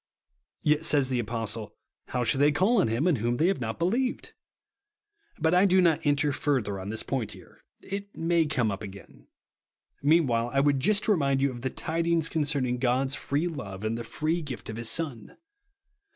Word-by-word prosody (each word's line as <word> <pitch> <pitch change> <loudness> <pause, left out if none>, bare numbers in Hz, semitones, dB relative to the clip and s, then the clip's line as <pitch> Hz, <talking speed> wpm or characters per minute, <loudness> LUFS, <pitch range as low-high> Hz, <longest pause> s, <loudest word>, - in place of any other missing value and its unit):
Yet 150 +1 +2
says 145 -4 +2
the 125 -2 0
Apostle, 115 -2 -3 0.3
"How 125 - -1
shall 135 +3 +2
they 145 +1 +5
call 195 +8 +3
on - - +1
him 115 +7 0
in 175 -6 +3
whom 120 +2 -1
they 160 - +2
have 195 -9 -1
not 110 -1 -3
believed 235 +9 0
V - - -14 1.1
But 160 +1 +1
I 180 +2 +5
do 190 0 +4
not 170 -4 +3
enter 145 0 +2
further 130 -9 -1
on 95 +1 -6
this 110 +1 -2
point 125 -6 -3
here. - - -16 0.2
It 200 +1 -6
may 165 -1 +2
come 125 -8 0
up 100 - -5
again. 100 -2 -11 0.8
Meanwdiile, 135 -6 +2
T - - +4
w^ould 140 -1 +3
just 210 +9 +2
remind 140 -10 +2
you 140 0 +1
of 120 -1 -9
the 130 - -1
tidings 165 +2 0
con 160 - -1
cerning 130 -5 0
God's 130 +2 +1
free 145 +3 -1
love, 100 - -6
in 110 - 0
the 115 +1 -4
free 155 +8 -2
gift 130 -8 -7
of 110 - -7
1 - - -5
lis 115 -1 -2
Son. 130 -4 -4
140 Hz, 200 wpm, -27 LUFS, 120-165 Hz, 1.1 s, they